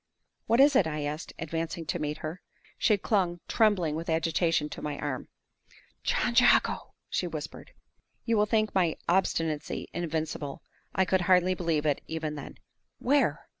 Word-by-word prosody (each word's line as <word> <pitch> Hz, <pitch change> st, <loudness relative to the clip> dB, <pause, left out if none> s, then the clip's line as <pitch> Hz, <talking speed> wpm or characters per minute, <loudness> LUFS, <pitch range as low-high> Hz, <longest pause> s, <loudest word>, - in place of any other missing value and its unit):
"What 230 Hz, -, +3 dB
is 280 Hz, +1 st, +6 dB
it?" 190 Hz, -, +5 dB
I 150 Hz, -1 st, -3 dB
asked, 150 Hz, +2 st, -4 dB
advancing 165 Hz, +1 st, -3 dB
to 175 Hz, -, -2 dB
meet 150 Hz, 0 st, -2 dB
her. 160 Hz, +4 st, -5 dB, 0.4 s
She 210 Hz, -, +4 dB
clung, 185 Hz, -4 st, 0 dB
trembling 205 Hz, -9 st, +2 dB
with 165 Hz, +1 st, -4 dB
agitation, 165 Hz, -1 st, +1 dB
to -, -, -7 dB
my 150 Hz, -1 st, -3 dB
arm. 145 Hz, -4 st, -4 dB, 0.7 s
"John -, -, 0 dB
Jago!" -, -, +4 dB
she 180 Hz, -, -1 dB
whispered. 155 Hz, -3 st, -7 dB, 0.5 s
You 230 Hz, -, +2 dB
will 210 Hz, 0 st, +3 dB
think 215 Hz, -1 st, +1 dB
my 175 Hz, -4 st, +2 dB
obstinacy 165 Hz, -4 st, 0 dB
invincible. 155 Hz, -4 st, -3 dB, 0.3 s
I 190 Hz, -, +3 dB
could 185 Hz, +1 st, +2 dB
hardly 185 Hz, 0 st, +4 dB
believe 165 Hz, -4 st, -1 dB
it, 145 Hz, -2 st, +1 dB
even 160 Hz, -1 st, -3 dB
then! 145 Hz, -, -8 dB, 0.4 s
"Where?" 280 Hz, +3 st, +1 dB
165 Hz, 155 wpm, -29 LUFS, 155-190 Hz, 0.7 s, is